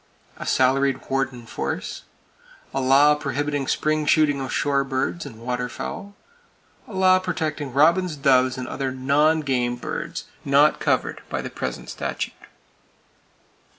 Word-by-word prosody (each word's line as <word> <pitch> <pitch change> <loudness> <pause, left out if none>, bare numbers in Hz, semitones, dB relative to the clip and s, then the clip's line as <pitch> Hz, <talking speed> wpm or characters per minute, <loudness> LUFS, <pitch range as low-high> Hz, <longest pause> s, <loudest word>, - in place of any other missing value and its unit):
A - - -7
salaried 135 +1 +2
warden 135 -3 -1
force. 115 - -4 0.7
A 135 - 0
law 140 +3 +6
prohibiting 145 -1 -2
spring 155 -1 0
shooting 150 -3 +3
of 130 - -4
shore 140 -1 +1
birds 135 +5 -2
and 110 0 -12
waterfowl. 125 +11 -4 0.7
A - - -11
law 185 0 +5
protecting 155 -6 -3
robins, 165 +5 +3
doves 130 -3 +3
and 125 -1 -5
other 135 0 -3
non 145 +5 +2
game 125 -4 0
birds 120 - -5 0.2
not 140 +2 +4
covered - - 0
by - - -3
the - - -6
present - - -5
statute. - - -4
140 Hz, 130 wpm, -23 LUFS, 130-150 Hz, 0.7 s, law